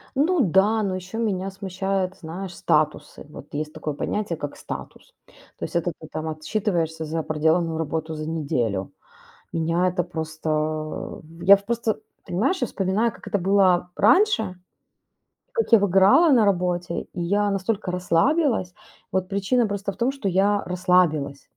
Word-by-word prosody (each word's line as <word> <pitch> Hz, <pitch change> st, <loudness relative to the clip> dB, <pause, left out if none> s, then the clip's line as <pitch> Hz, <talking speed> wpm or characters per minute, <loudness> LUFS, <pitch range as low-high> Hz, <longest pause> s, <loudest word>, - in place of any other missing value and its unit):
Ну 320 Hz, +4 st, +2 dB
да. 205 Hz, +2 st, +3 dB
Но 195 Hz, -2 st, -1 dB
еще 185 Hz, +4 st, -6 dB
меня 195 Hz, -4 st, -1 dB
смущают, 190 Hz, 0 st, -2 dB
знаешь, 180 Hz, +2 st, -7 dB
статусы. 150 Hz, 0 st, 0 dB
Вот 150 Hz, -, -11 dB
есть 150 Hz, +1 st, -3 dB
такое 150 Hz, -1 st, -4 dB
понятие, 190 Hz, +3 st, -2 dB
как 145 Hz, -1 st, -6 dB
статус. -, -, -9 dB, 0.4 s
То -, -, -4 dB
есть -, -, -4 dB
это 170 Hz, 0 st, 0 dB
ты 155 Hz, -, -10 dB
там 160 Hz, 0 st, -4 dB
отчитываешься 160 Hz, 0 st, -2 dB
за 160 Hz, +1 st, -2 dB
проделанную 160 Hz, +2 st, +1 dB
работу 160 Hz, 0 st, -3 dB
за 155 Hz, 0 st, -5 dB
неделю. 120 Hz, -, -2 dB, 0.6 s
Меня 165 Hz, +2 st, +1 dB
это 180 Hz, 0 st, 0 dB
просто 155 Hz, -1 st, -3 dB, 0.2 s
Я 200 Hz, +2 st, +8 dB
в 200 Hz, -, -13 dB
просто, 230 Hz, -1 st, -1 dB, 0.3 s
понимаешь, 235 Hz, -, 0 dB
я 250 Hz, -, +1 dB
вспоминаю, 205 Hz, +3 st, 0 dB
как -, -, -11 dB
это 205 Hz, -, 0 dB
было 185 Hz, -2 st, +3 dB
раньше. 290 Hz, -, +3 dB, 1.0 s
Как 455 Hz, -, -1 dB
я 230 Hz, -, +9 dB
выгорала 200 Hz, -, +5 dB
на 230 Hz, -5 st, +5 dB
работе, 180 Hz, -2 st, 0 dB
и 175 Hz, -, -5 dB
я 205 Hz, +4 st, +1 dB
настолько 195 Hz, 0 st, -1 dB
расслабилась. 185 Hz, -, +1 dB, 0.4 s
Вот 185 Hz, -1 st, 0 dB
причина 205 Hz, +4 st, +1 dB
просто 200 Hz, 0 st, -3 dB
в 190 Hz, -, -15 dB
том, 245 Hz, +3 st, +1 dB
что 270 Hz, -8 st, -2 dB
я 200 Hz, +2 st, +2 dB
расслабилась. 175 Hz, -6 st, +1 dB
185 Hz, 155 wpm, -24 LUFS, 160-205 Hz, 1.0 s, я